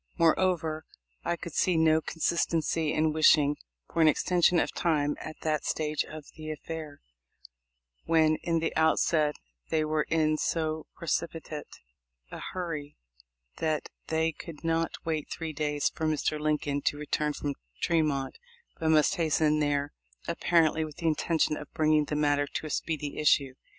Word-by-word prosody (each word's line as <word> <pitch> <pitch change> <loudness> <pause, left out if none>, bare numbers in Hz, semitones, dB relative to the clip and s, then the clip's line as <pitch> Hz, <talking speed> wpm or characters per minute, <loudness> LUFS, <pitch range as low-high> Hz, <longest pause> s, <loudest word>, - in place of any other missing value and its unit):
More 165 -2 +5
over, 165 -4 0 0.4
I 170 - 0
could 170 -2 -8
see 180 -3 +2
no 160 0 +4
consistency 165 -1 0
in 155 0 +1
wishing 150 -2 +5 0.4
for 165 - +2
an 160 - +7
extension 175 +3 +3
of - - +1
time 150 -4 +1
at 155 - -7
that 155 -2 0
stage 155 -1 -1
of 155 -1 -9
the 155 -1 -7
affair, 155 -1 -6 1.0
when 155 -1 +4
in 170 -1 0
the 165 0 -1
outset 160 -1 +3 0.3
they 155 -1 +1
were 155 0 0
in 155 -1 +2
so 160 -1 -1
precipitate 165 -2 -3 0.6
a - - -7
hurry 160 -5 -5 0.6
that 155 -2 -1 0.2
they 160 0 +1
could 160 0 -10
not 165 0 +1 0.2
wait 160 -2 -2
three 160 -2 -4
days 150 -1 0
for 160 - -2
Mr. 155 0 0
Lincoln 150 -2 0
to 145 - 0
return 150 0 -1
from 145 0 -3 0.3
Tremont, 150 -5 0 0.4
but 160 - 0
must 155 -1 +4
hasten 155 -2 +2
there, 145 -1 0 0.3
apparently 160 -2 +2
with 155 -2 -8
the 170 - -6
intention 160 0 +1
of 150 - -9
bringing 155 -1 +3
the 150 - -3
matter 145 -1 +2
to 155 - -4
a 155 - -5
speedy 150 -2 -3
issue. 140 -3 +3
155 Hz, 155 wpm, -29 LUFS, 150-165 Hz, 1.0 s, an